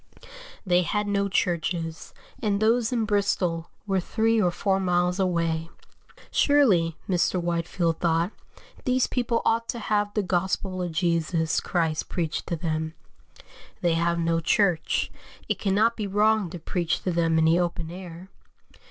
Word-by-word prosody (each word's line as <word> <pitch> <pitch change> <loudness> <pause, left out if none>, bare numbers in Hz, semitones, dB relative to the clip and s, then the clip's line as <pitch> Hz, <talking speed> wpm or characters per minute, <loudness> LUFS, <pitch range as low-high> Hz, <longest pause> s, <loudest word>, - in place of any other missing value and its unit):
They 180 -1 +3
had 210 +4 -1
no 200 -1 0
churches, 170 -2 -1 0.3
and 205 -3 +1
those 225 +2 +2
in 230 -3 0
Bristol 190 -5 0 0.2
were 195 -2 +1
three 225 +4 +1
or 180 - +3
four 190 +2 0
miles 180 0 +1
away. 165 -3 0 0.6
Surely, 195 - +3
Mr. 180 0 +1
Whitefield 170 -1 -1
thought, 170 +2 +1 0.5
these 255 0 +2
people 240 -2 -1
ought 230 +1 +1
to - - -2
have 210 -2 0
the 210 - +1
gospel 185 +1 -1
of 175 -1 -2
Jesus 165 -1 +1
Christ 160 -3 -1
preached 165 -4 -2
to 170 - -1
them; 160 -1 -3 0.9
they 175 -2 +2
have 170 +1 +1
no 165 0 +1
church, 175 0 +1 0.4
it - - -1
cannot 215 +4 +2
be 210 -2 -3
wrong 210 -1 +2
to 175 - -7
preach 170 0 -2
to 185 - 0
them 165 -1 +2
in 160 - +4
the 165 +2 +4
open 170 -2 -2
air. 180 0 -9
180 Hz, 150 wpm, -26 LUFS, 165-205 Hz, 0.9 s, in